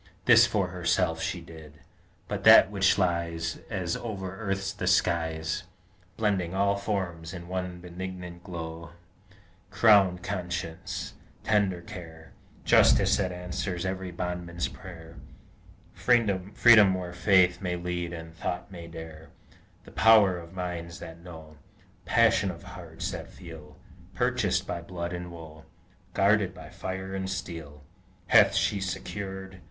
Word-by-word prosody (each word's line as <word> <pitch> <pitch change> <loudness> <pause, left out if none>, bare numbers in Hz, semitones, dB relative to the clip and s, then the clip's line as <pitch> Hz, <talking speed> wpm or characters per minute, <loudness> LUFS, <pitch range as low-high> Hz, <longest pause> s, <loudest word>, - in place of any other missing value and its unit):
This 120 -1 +7
for 100 -4 0
herself 90 -2 0
she 90 - -3
did; 80 -2 -12 0.5
but - - -4
that 95 - +8
which 95 -1 +3
lies, 85 -2 -1
As 90 -5 -2
over 95 -5 -5
earth 100 -1 -3
the 90 - -3
skies, 85 -1 +1 0.5
Blending 95 -5 0
all 100 +1 +2
forms 95 -4 -3
in 85 -1 -9
one 90 -1 -4
benignant 90 0 -8
glow, 85 -1 -7 0.8
Crowned 95 -5 +4
conscience, 90 -1 -4 0.3
tender 100 -5 +1
care, 85 -5 -11 0.3
Justice - - +5
that 95 -2 -1
answers 90 0 -4
every 95 0 -3
bondman's 85 -1 -3
prayer, 85 -3 -11 0.8
Freedom 105 -2 +4
where 90 -1 -5
Faith 90 0 +3
may 90 -2 -2
lead 85 -1 -3
and 80 -1 -8
Thought 90 +3 -4
may 85 -3 -9
dare, 80 -1 -10 0.5
The - - -14
power 105 -5 +5
of 85 0 -12
minds 90 -2 -5
that 80 +1 -10
know, 80 -3 -12 0.5
Passion 115 -4 +3
of 85 -2 -8
hearts 85 -3 -6
that - - -7
feel, - - -12 0.4
Purchased - - +1
by 85 - -4
blood 85 0 -5
and 90 0 -6
woe, 80 -2 -11 0.5
Guarded 100 -1 +3
by - - -11
fire 95 +1 -5
and 95 0 -3
steel, 80 -5 -6 0.4
Hath - - +6
she 100 - +1
secured? 95 0 -5
90 Hz, 130 wpm, -28 LUFS, 85-95 Hz, 0.8 s, that